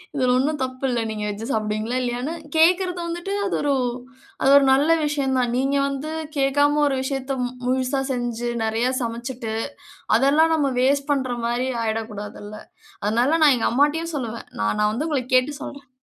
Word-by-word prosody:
இதுல 255 -3 +2
ஒண்ணும் 295 +4 0
தப்பில்ல. 255 -1 -2
நீங்க 215 -1 -4
வெஜ் 205 +1 -5
சாப்பிடுவீங்களா? 215 +2 -1
இல்லையான்னு 250 +5 -2 0.2
கேக்குறது 360 +2 +3
வந்துட்டு 345 +3 -4
அது 390 - -1
ஒரு, 290 -1 +1 0.7
அது 270 - +4
ஒரு 280 - +5
நல்ல 285 +4 +3 0.2
விஷயம் 280 -3 0
தான். 245 -1 +1
நீங்க 270 +2 +1
வந்து 280 +3 -4 0.3
கேக்காம 285 +2 +3
ஒரு 275 - 0
விஷயத்த, 270 0 -3
மு 245 - -1 0.2
முழுசா 260 +2 0
செஞ்சி, 240 -1 -2
நெறையா 225 +3 0
சமைச்சிட்டு, 235 -1 -4 0.6
அதெல்லாம் 300 +6 +4
நம்ம 285 -3 +1
வேஸ்ட் 280 +2 +2
பண்ற 260 -3 0
மாரி 240 +2 0 0.2
ஆயிறக்கூடாது 220 -2 -4
இல்ல. 210 +1 -8 0.5
அதனால 240 +10 +2
நான் 290 -4 +6
எங்க 230 - +1
அம்மாட்டையும் 300 +6 +1
சொல்லுவேன், 235 -4 -5
நா 105 - +1
நா 210 - +3
வந்து 290 +8 -2
உங்கள 285 -4 0
கேட்டுட்டு 280 +3 +2
சொல்றேன். 280 -1 -9
265 Hz, 165 wpm, -23 LUFS, 240-290 Hz, 0.7 s, நான்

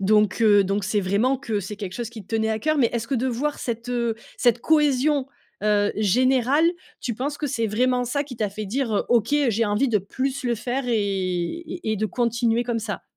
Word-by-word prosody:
Donc 210 +2 +3
heu, 205 -3 +5
donc 195 +1 -1
c'est 210 +1 +1
vraiment 205 +8 +1
que 225 -6 -2
c'est 200 +3 -6
quelque 200 -3 -6
chose 240 -2 -4
qui 225 -3 -9
te 225 - -6
tenait 220 0 +1
à 220 - 0
cœur. 310 +4 0
Mais, 240 -4 +4
est-ce 230 -1 -2
que, 275 - 0
de 255 +1 0
voir 265 +4 -1
cette, 235 0 -4
heu, 235 -2 0 0.2
cette 240 -1 +3
cohésion, 295 -2 +2 0.4
heu, 205 -1 +2
générale, 255 - +3 0.3
tu 235 - -3
penses 285 +6 -3
que 295 - -3
c'est 230 -5 -1
vraiment 250 +4 +1
ça 280 +4 -1
qui 255 -4 -9
t'a 215 -2 0
fait 210 +2 -6
dire, 230 +2 -1
heu: - - +1
«OK, 235 +2 +2
heu, 285 -4 +3
j'ai 230 +1 +1
envie 210 +6 +1
de 215 -3 +3
plus 260 +7 -3
le 240 - +1
faire 245 +4 -3
et 240 - +1
et 200 - -2
et 215 - -1
de 215 +2 0
continuer 235 0 +1
comme 240 -1 -1
ça»? 215 -2 -5
235 Hz, 235 wpm, -24 LUFS, 210-260 Hz, 0.4 s, heu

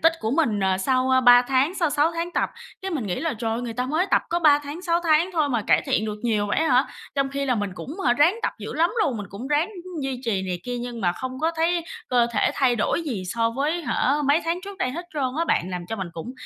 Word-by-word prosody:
tích 330 0 +5
của 220 - -1
mình, 255 -9 +1
ờ, 190 -1 +1
sau, 255 +5 +1
ơ, 260 0 +5
3 245 -1 +7
tháng, 270 +7 +1
sau 335 -5 +1
6 295 +4 +2
tháng 335 +1 -3
tập." - - 0 0.3
Cái 385 - -3
mình 280 - -2
nghĩ 180 - -2
là 325 -5 -1
"Trời 225 0 -2
ơi! 230 - -2
Người 235 - -4
ta 250 +2 -2
mới 315 +8 +1
tập - - +4
có 345 - +1
3 300 -4 +5
tháng, 290 +4 -8
6 340 -2 +1
tháng 325 +3 +3
thôi 310 -4 +1
mà 235 -5 0
cải - - +4
thiện 215 - +1
được 210 -1 -3
nhiều 215 -4 +1
vậy 205 - 0
ấy 320 - +2
hả?" 255 +1 +4 0.3
Trong 275 -1 +1
khi 280 0 -2
là 255 -2 +1
mình 205 -3 -2
cũng, 310 - -7
hả, 240 - +5
ráng 295 +8 +4
tập - - 0
dữ - - -6
lắm 335 +3 +2
luôn, 260 - -1
mình 205 -2 -6
cũng 215 +6 -7
ráng, 295 +6 +2 0.2
ưm, 360 -4 -6
duy 265 -2 -3
trì 200 -5 0
này 180 -2 -4
kia 245 0 -3
nhưng 240 -1 -6
mà 175 -3 +2
không 260 +6 -6
có 320 +1 +2
thấy 335 +1 +1 0.2
cơ 245 -2 +3
thể 210 - +2
thay 250 -3 +2
đổi 225 +9 0
gì 245 - -3
so 230 +4 0
với, 295 +8 -1
hả, 280 -3 +1
mấy 295 +4 +4
tháng 335 +2 -1
trước 400 -1 -9
đây 315 - 0
hết 345 +6 -6
trơn 290 - -1 0.2
á 335 - +2
bạn, 185 - 0
làm 180 -1 -5
cho 225 - -4
mình 190 -4 -4
cũng 165 +10 -7
260 Hz, 290 wpm, -24 LUFS, 230-325 Hz, 0.3 s, 3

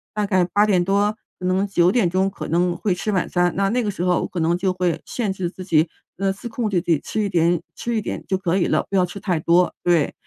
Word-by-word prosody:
大 210 -1 0
概 185 -3 +2
8:00 200 0 +2
多、 200 +3 +1 0.2
可 180 - -5
能 185 +2 +1
9:00 190 0 +2
可 195 - -7
能 175 +1 +1
会 185 +1 -1
吃 210 +4 -2
晚 185 - 0
餐。 175 -1 +1
那 195 +1 +1
那 245 +3 0
个 210 - -1
时 190 - -6
候 180 -1 +2
我 - - -2
可 180 - -5
能 165 +1 +2
就 185 0 0
会 180 -2 -1
限 215 -6 -2
制 185 -2 -3
自 185 0 -10
己， 160 -2 +2 0.3
呃， 195 +1 +1
自 205 +5 -7
控 230 -1 -2
地 190 -3 +1
自 - - -21
己 155 - +3
吃 215 - -2
一 205 - 0
点 170 -1 +2
吃 235 - -3
一 220 - +2
点 - - -5
就 190 - +1
可 185 -1 0
以 180 - +1
了， - - +1
不 200 - -3
要 185 -1 +4
吃 190 +3 -8
太 180 -5 -1
多。 175 +3 +3
对， 170 -4 +2
185 Hz, 275 characters per minute, -22 LUFS, 175-200 Hz, 0.3 s, 要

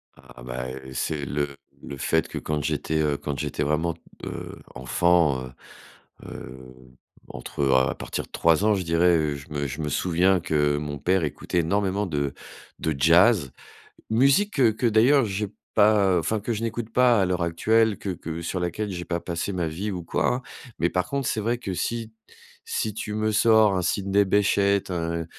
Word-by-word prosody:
Ah, - - -15
bah, 60 0 -5 0.3
c'est 75 +2 -2
le 70 +2 -1 0.4
le 70 - -7
fait 80 +4 +1
que - - -7
quand 75 -1 -2
j'étais, 80 0 -1
heu, 75 -2 +1
quand 70 -3 -5
j'étais 75 - -2
vraiment, 80 +3 0 0.3
heu, - - -7 0.2
enfant, 70 +3 +2
heu - - -13 0.8
heu, 65 0 -10 0.5
entre, - - -6
heu, 65 -1 +3
à 65 0 +2
partir - - -4
de - - -29
3 85 +3 +2
ans 110 -1 +4
je 95 - -2
dirais, 85 +1 +3
heu, 75 -2 -1
je 70 +1 -11
me 70 -1 -2
je 70 +4 -5
me 75 - -2
souviens 90 +5 +2
que 75 -2 +1
mon 75 -1 -5
père 90 +5 +1
écoutait 80 +3 -2
énormément 100 +3 0
de 70 -4 -2 0.5
de 80 -2 -1
jazz. 85 - +4 0.6
Musique 140 - +3
que 125 -6 +4
que 110 +4 -3
d'ailleurs 120 +5 +4
j'ai 105 0 -2 0.3
pas, 105 -3 +4
heu, - - +3
enfin, 110 +6 -1
que 115 +3 -2
je 110 +1 -4
n'écoute 115 0 -4
pas 120 -3 +4
à - - +3
l'heure 90 -1 -1
actuelle 110 +5 +2
que 100 - -5
que 80 -1 -6
sur 90 +2 -3
laquelle 90 +4 -3
j'ai 85 -1 -5
pas 85 -1 -2
passé 85 +3 -3
ma 90 -3 -1
vie 95 +7 -4
ou 90 -2 -5
quoi - - 0
hein. 125 - -5 0.4
Mais 85 - +2
par 90 0 -1
contre, 140 -2 -1
c'est 110 - -1
vrai 115 +3 0
que 100 -6 -4
si 115 +4 -3 0.6
si 110 - -1
tu 105 0 -5
me 110 0 0
sors 110 -2 +4
un - - 0
Sidney 100 +3 +1
Bechet, 100 0 +2
un 85 -1 -2
90 Hz, 195 wpm, -25 LUFS, 75-105 Hz, 0.8 s, ans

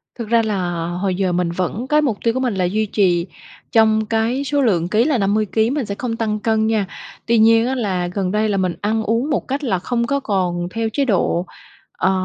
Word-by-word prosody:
Thực 230 -3 -6
ra 230 0 +4
là 175 -5 -2
hồi 180 +2 -2
giờ 185 -1 0
mình 175 -1 0
vẫn 185 +8 -3
cái 300 +1 +3
mục 245 -9 0
tiêu 230 - +2
của 260 - -1
mình 255 -4 0
là 185 - +1
duy 215 +5 0
trì 185 -4 +1 0.4
trong 220 -1 +3
cái 230 +5 0
số 285 +1 0
lượng 175 -9 +2
ký 215 +5 +2
là 280 -2 +1
50 210 +1 +1
ký, 220 +3 +1
mình 275 -1 -1
sẽ 200 - -4
không 235 +1 -3
tăng 220 -2 -2
cân 220 0 +1
nha. 220 -3 +1 0.4
Tuy 235 0 +2
nhiên 225 +1 +5
á 265 - -1
là 190 -7 -1
gần 185 0 -2
đây 215 +1 +1
là 200 - 0
mình 185 -2 0
ăn 220 +2 0
uống 230 +7 0
một 295 - -1
cách 275 +3 -3
là 195 -9 0
không 235 +5 -1
có 280 +2 0
còn 180 -7 -1
theo 225 +1 -2
chế 280 -1 +1
độ, 180 -5 +1 0.5
ờ, 190 - +2
215 Hz, 240 wpm, -19 LUFS, 185-235 Hz, 0.5 s, nhiên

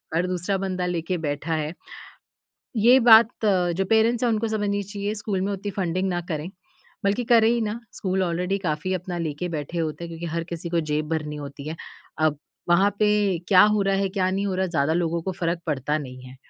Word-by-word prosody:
हर 175 +2 +1
दूसरा 185 +2 -1
बंदा 185 -1 -2
लेके 175 0 -2
बैठा 145 +3 -2
है। 155 +1 -2 1.0
ये 240 +4 +6
बात 230 -1 +6
अ, 180 -4 +2
जो 190 +3 -1
पेरेंट्स 225 +4 +2
हैं 240 - +3
उनको 225 +1 0
समझनी 205 -2 -1
चाहिए, 205 +1 -4
स्कूल 205 -2 -3
में 195 +2 -1
उतनी 200 +1 -4
फ़ंडिंग 185 0 -1
ना 175 -1 -1
करें, 160 +1 -3 0.5
बल्कि 205 +5 +1
करे 225 -1 +5
ही 240 0 +1
ना, 215 +2 -3
स्कूल 190 0 -1
ऑलरेडी 180 +3 -1
काफ़ी 180 +1 -2
अपना 180 0 -4
लेके 165 +1 -3
बैठे 160 +1 -4
होते 160 +1 -3
हैं - - -6
क्योंकि 165 +1 -6
हर 165 - -1
किसी 170 0 -5
को 170 -1 +2
जेब 150 0 -1
भरनी 155 -2 -2
होती 145 0 -7
है। 160 - -5 0.4
अब 155 -2 +2 0.3
वहाँ 190 +4 +4
पे 210 -1 +3 0.4
क्या 185 -2 +7
हो 210 - +2
रहा 195 0 +1
है, 195 0 +1
क्या 185 -1 0
नहीं 195 +2 -1
हो 190 - -1
रहा 190 - 0
है, 185 - -4
ज़्यादा 155 -2 +1
लोगों 170 -1 0
को 190 - -3
फ़र्क़ 170 0 0
पड़ता 150 0 -1
नहीं 130 -3 -8
है। 130 +1 -12
180 Hz, 220 wpm, -24 LUFS, 165-200 Hz, 1.0 s, क्या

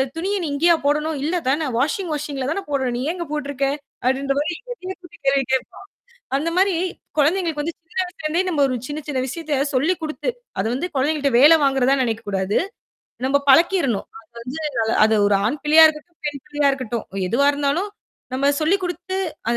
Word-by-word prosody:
துணிய 380 +5 -1
நீ - - -1
இங்கேயா 340 +4 +4
போடணும்? 300 +1 +1
இல்ல 325 +4 0
தானே? 295 +4 +1
வாஷிங் 320 - 0
மெசின்ல 285 -3 -3
தானே 395 - -1
போடணும். 265 -4 0
நீ 245 - -3
ஏங்க 345 -1 -5
போட்டுருக்க?" 285 -2 -2 0.4
அப்படின்ற 270 +2 +1
மாரி 315 +4 -1 0.2
என்னையே 380 -5 -6
கூப்டி 345 -1 -15
கேள்வி 275 0 +3
கேப்பான். 260 +7 -2 0.5
அந்த 315 +4 -1
மாரி 385 0 +4 0.4
குழந்தைங்களுக்கு 320 0 +2
வந்து 330 +2 -4
சின்ன 345 +3 -15
வயசுலருந்தே 335 -1 -2
நம்ம 310 -5 0
ஒரு 255 - -1
சின்ன 295 +1 -4
சின்ன 280 -3 -1
விஷயத்த 300 -1 -2
சொல்லி 285 +8 +2
குடுத்து 310 +9 -3 0.3
அத 195 - 0
வந்து 295 +8 -2
குழந்தைங்கள்ட்ட 285 0 +1
வேல 295 +5 +8
வாங்குறதா 270 -1 +3
நெினைக்கக்கூடாது. 205 -4 -1 0.7
நம்ம 275 - +3
பழக்கிறணும். 325 - +3 0.2
அது 220 - -32
வந்து 260 +6 -6 0.4
அது 220 +1 +3
ஒரு 205 - +3
ஆண் 290 +6 -2
பிள்ளையா 315 +2 +8
இருக்கட்டும், 315 +2 -7
பெண் 285 -2 -3
பிள்ளையா 290 -1 +2
இருக்கட்டும். 240 -4 -3 0.2
எதுவா 265 +8 +2
இருந்தாலும், 290 +8 -1 0.4
நம்ம 280 +2 +2
சொல்லி் 335 +6 +3
குடுத்து 355 +2 -4 0.3
அத 235 - +1
295 Hz, 170 wpm, -21 LUFS, 265-335 Hz, 0.7 s, வேல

